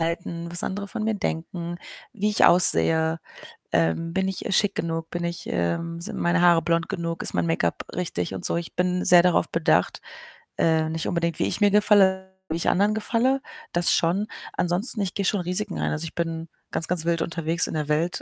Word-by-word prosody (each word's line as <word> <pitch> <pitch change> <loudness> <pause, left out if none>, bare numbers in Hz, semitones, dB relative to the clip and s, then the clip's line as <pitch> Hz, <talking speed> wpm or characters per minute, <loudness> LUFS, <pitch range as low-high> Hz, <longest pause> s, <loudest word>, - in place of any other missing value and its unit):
halten, 170 0 -3
was 175 0 -1
andere 200 +1 -4
von 215 - -4
mir 220 -1 0
denken, 170 -1 -4 0.4
wie 210 0 -1
ich 210 - +3
aussehe. 160 -2 +4 0.5
Ähm, 85 - 0
bin 190 0 0
ich, 190 -1 -4
äh, - - -2
schick 205 +1 +2
genug? 165 0 -3
Bin 175 0 -4
ich, 170 0 -4
ähm 90 - -2
sind 170 - -6
meine 175 +1 +2
Haare 175 -2 +5
blond 165 -1 0
genug? 165 -1 -3
Ist - - +1
mein 85 -1 0
Make-up 85 +1 -1
richtig 95 - -3
und 90 - -2
so. - - 0
Ich 170 -1 -6
bin 180 0 0
sehr 175 -1 +7
darauf 180 -1 +2
bedacht, 90 - +1 0.6
äh, 160 -1 +2
nicht 160 0 -3
unbedingt 170 -2 -1
wie - - +1
ich - - -2
mir 205 -1 +5
gefalle, 190 -2 +3 0.2
wie 160 - -1
ich 170 - 0
anderen 205 +3 +2
gefalle, 245 +5 +1 0.3
das 175 0 +3
schon. 185 +6 +1 0.3
Ansonsten, 185 +5 +1
ich 190 -2 -3
gehe 200 - -1
schon 200 0 +1
Risiken 180 +3 -2
ein. - - 0
Also, 155 +1 -2
ich 165 - -8
bin 165 -1 -3 0.2
ganz 165 - -2
ganz 170 -2 -1
wild 170 -1 +1
unterwegs 165 0 -1
in - - -6
der 150 -2 -2
Welt 160 +3 0
170 Hz, 210 wpm, -24 LUFS, 165-190 Hz, 0.6 s, sehr